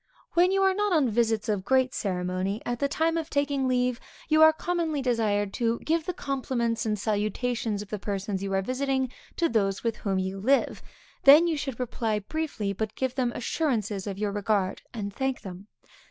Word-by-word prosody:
When 355 +2 +4
you 390 0 +2
are 385 0 +4
not 415 +1 0
on 285 -8 +3
visits 225 -1 +1
of 205 -3 0
great 260 +3 +2
ceremony, 185 +1 -2
at 240 0 -2
the 280 - +2
time 325 +3 0
of 320 -2 -3
taking 285 -2 0
leave, 250 -1 +1 0.3
you 310 0 +4
are 315 0 +9
commonly 325 -2 -1
desired 215 -6 0
to 230 -1 0
give 325 0 0
the - - +1
compliments 255 -7 -2
and 210 -1 0
salutations 215 +1 -1
of 205 - -17
the 210 - -3
persons 195 -1 -3
you 195 0 -3
are 195 0 +1
visiting 265 +1 -1 0.2
to 340 - +2
those 195 -6 0
with 230 -2 -1
whom 195 -2 -1
you 190 +1 -2
live, 265 +7 +1 0.4
then 295 +5 +9
you 335 -2 +1
should 270 -5 -4
reply 225 -3 -1
briefly, 215 -3 -3
but 215 +2 -4
give 260 -1 -1
them 255 -2 0
assurances 225 - -1
of 195 -1 -4
your 205 0 -1
regard, 200 -2 0
and 200 -3 -5
thank 265 +1 -2
them. 190 +1 -9
235 Hz, 195 wpm, -27 LUFS, 205-280 Hz, 0.4 s, are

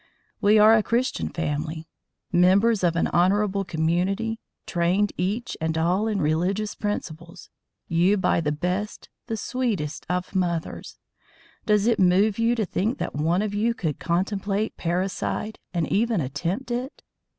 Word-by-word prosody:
We 210 +2 +5
are 215 +1 +7
a 225 - +5
Christian 240 +4 -1
family, 160 0 -3 0.4
members 190 +4 +4
of 170 -2 +2
an 165 - +2
honourable 195 +2 +2
community, 185 +7 -1 0.3
trained 180 +4 +1
each 210 +7 -2
and 160 0 -1
all 180 +6 +1
in 210 -3 0
religious 180 +7 0
principles, 170 -4 -5 0.4
you, 175 +5 +3
by 185 - +2
the 150 -2 0
best, 180 +7 -3 0.2
the 225 -2 -2
sweetest 210 - -2
of 180 +1 -2
mothers 175 -4 -2 0.7
does 210 -1 +3
it 235 -2 +2
move 195 +3 +3
you 230 +1 +3
to 220 -3 0
think 210 +7 -1
that - - -4
one 165 +7 +1
of 210 -1 -3
you 225 +3 +1
could 160 - -3
contemplate 195 +4 -1
parricide 185 +4 -2
and 170 -3 0
even 225 -1 +2
attempt 170 - -3
it? 250 +3 -4
190 Hz, 145 wpm, -24 LUFS, 170-215 Hz, 0.7 s, are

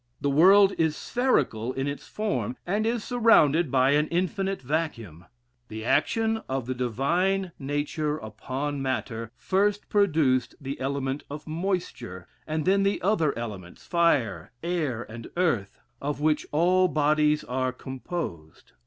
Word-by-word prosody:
The 140 - 0
world 195 +6 +6
is 160 -2 +2
spherical 130 - 0
in 135 +1 -2
its 140 0 -5
form; 220 +4 -2
and 210 +5 0
is 230 -1 -1
surrounded 175 - +4
by 130 +1 +3
an 150 +1 +3
infinite 190 +2 -1
vacuum. 120 - -3 0.4
The 110 0 -7
action 225 - +1
of 130 -2 -2
the 130 - -2
divine 170 - 0
nature 150 +2 -2
upon 135 +5 -4
matter 115 -4 -3
first 200 +2 0
produced 155 - +2
the 140 -1 -6
element 135 +1 -2
of 145 +1 -7
moisture, 155 - -3 0.2
and 155 -1 -2
then 195 +2 +3
the 195 +1 +1
other 165 - +1
elements, 100 -7 -7
fire, 155 - +1
air, 155 -9 -1
and 115 0 -9
earth, 125 - 0 0.2
of 145 +1 -3
which 150 0 +1
all 180 +4 +4
bodies 150 -1 +2
are 130 +1 -1
composed. 130 - -7
150 Hz, 135 wpm, -26 LUFS, 130-185 Hz, 0.4 s, world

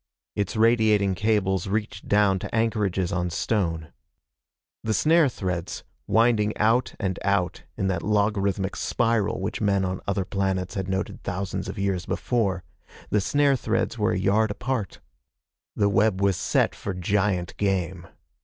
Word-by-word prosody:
Its 100 +3 -2
radiating 110 -3 +3
cables 100 -1 +1
reached 105 0 -3
down 100 -2 +3
to - - -5
anchorages 105 -5 0
on 90 -2 -1
stone. 80 -3 -1 0.9
The 110 -1 0
snare 160 -2 +4
threads, 90 -6 -4 0.2
winding 110 -2 +3
out 115 +4 +2
and 95 -3 -2
out 100 -3 0
in 95 - -1
that 95 -3 0
logarithmic 100 -2 0
spiral 115 -4 0
which 95 +4 -3
men 100 -2 +2
on 95 0 -3
other 100 -1 0
planets 95 -1 -1
had 95 -2 -3
noted 95 0 -3
thousands 95 +2 -3
of - - -6
years 95 -3 -1
before 100 -7 0 0.5
the 105 - +3
snare 145 +5 +3
threads 115 -1 -1
were 105 +2 +2
a - - 0
yard 100 +3 +2
apart. 115 -1 -3 0.7
The 100 - +2
web 100 -1 +2
was 100 -1 +2
set - - +1
for 100 - -5
giant 95 -1 0
game. 95 -3 -1
100 Hz, 145 wpm, -25 LUFS, 95-110 Hz, 0.9 s, snare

